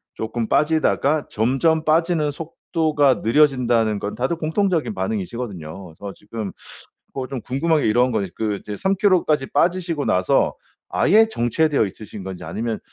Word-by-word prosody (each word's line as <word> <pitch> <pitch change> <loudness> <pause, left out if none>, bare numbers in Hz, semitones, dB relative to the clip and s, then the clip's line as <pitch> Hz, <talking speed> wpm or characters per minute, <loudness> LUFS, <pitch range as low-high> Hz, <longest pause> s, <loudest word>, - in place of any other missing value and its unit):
쪼금 110 +1 -3
빠지다가 155 -1 +2
점점 135 +8 +1
빠지는 160 -1 +2
속도가 155 -2 0
느려진다는 120 -5 +3
건 105 - -4
다들 130 +8 -1
공통적인 175 +3 0
반응이시거든요. 120 - -5
그래서 95 +4 -9
지금 105 -1 -6 0.6
뭐 130 -2 -3
좀 135 -1 -5
궁금한 150 +5 +1
게 - - +1
이런 120 +4 +3
거 110 -3 0
이 95 - -5
그 105 -2 -1
이제 105 - -6
3 190 - +1
킬로까지 180 -8 +2
빠지시고 170 -1 +1
나서 90 0 +2 0.3
아예 220 +2 +4
정체되어 145 - +1
있으신 105 +1 -9
건지 95 -1 -7
아니면 115 -1 -3
135 Hz, 350 characters per minute, -21 LUFS, 110-160 Hz, 0.6 s, 아예